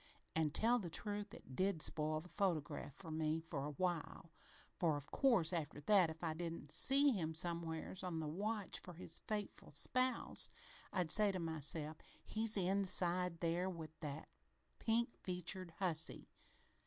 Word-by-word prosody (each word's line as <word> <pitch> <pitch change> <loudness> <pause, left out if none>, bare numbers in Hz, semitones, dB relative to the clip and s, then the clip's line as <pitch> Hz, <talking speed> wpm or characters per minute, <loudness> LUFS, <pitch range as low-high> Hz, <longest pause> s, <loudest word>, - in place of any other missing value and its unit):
An', 160 -1 +3
tell 235 +10 +3
the 180 -6 -4
truth, 205 +4 -3
it 130 - -11
did 190 0 +1
spoil 155 0 0
the 175 - -12
photograph 170 -7 -1
for 170 -5 -8
me 155 0 0
for 160 -4 -4
a - - -2
while, 170 -1 -2 0.5
for, 160 -4 +2
of 140 -1 -10
course, 220 - +4
after 150 -4 -2
that, 185 +1 +5
if 160 +1 -8
I 160 -2 0
didn't 165 -3 -5
see 280 - +6
him 160 -8 -1
somewheres 170 +2 -1
on 175 -3 -2
the 160 - -3
watch 205 +6 -2
for 180 - -9
his 165 -1 -7
faithful 210 -2 -4
spouse, 255 - +2 0.4
I'd 180 -5 0
say 210 -1 +6
to 190 - -3
myself, 160 -1 +1 0.3
'He's 220 0 0
inside 180 -2 +2
there 175 +2 +1
with 165 -4 -6
that 150 -1 -5 0.5
pink 235 +1 +1
featured 180 -1 -3
hussy!' 165 -5 -2
175 Hz, 155 wpm, -39 LUFS, 160-195 Hz, 0.5 s, see